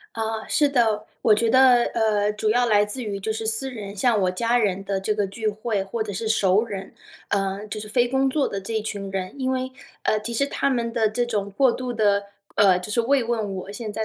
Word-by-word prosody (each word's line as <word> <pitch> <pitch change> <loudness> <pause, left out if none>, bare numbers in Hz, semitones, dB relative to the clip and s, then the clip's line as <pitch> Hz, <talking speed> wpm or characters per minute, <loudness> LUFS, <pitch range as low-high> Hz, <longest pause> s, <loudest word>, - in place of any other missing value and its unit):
啊， 220 0 -3
是 295 -2 +3
的， 220 -5 +1 0.2
我 220 - +5
觉 225 +2 +3
得， 255 -1 +6
呃， 210 -2 +2
主 215 0 -1
要 245 +2 +3
来 210 -2 +4
自 210 +5 -5
于 200 -4 -4
就 220 +3 -2
是 220 0 -4
私 245 +5 0
人 205 -4 -7
像 220 0 +2
我 185 - +2
家 230 +6 +1
人 195 -3 0
的 195 -1 -2
这 210 +2 0
个 205 -1 0
聚 215 +2 -3
会， 210 -1 -2
或 220 +3 -3
者 210 -2 -5
是 220 +4 -4
熟 210 -2 +3
儿 - - -13
人， 195 -2 -6 0.4
呃， 195 +1 -1
就 215 - -5
是 210 0 -7
非 240 +2 +2
工 265 +1 +2
作 285 +1 +1
的 200 - -4
这 220 +3 -2
群 200 -2 -5
人。 185 -1 -3
因 260 0 0
为 260 0 -2 0.3
呃， 215 - +2
其 230 +3 -5
实 275 +4 +1
他 275 0 -1
们 235 -3 -1
的 225 -3 +2
这 240 +3 -1
种 210 -4 -2
过 265 -3 +5
度 250 0 -4
的 205 -3 +2 0.3
呃， 190 -3 +5
就 210 - -7
是 235 - +2
慰 270 +1 +2
问 220 -4 -2
我 190 +1 -6
现 215 0 -6
在 220 +1 -2
220 Hz, 265 characters per minute, -23 LUFS, 205-240 Hz, 0.4 s, 得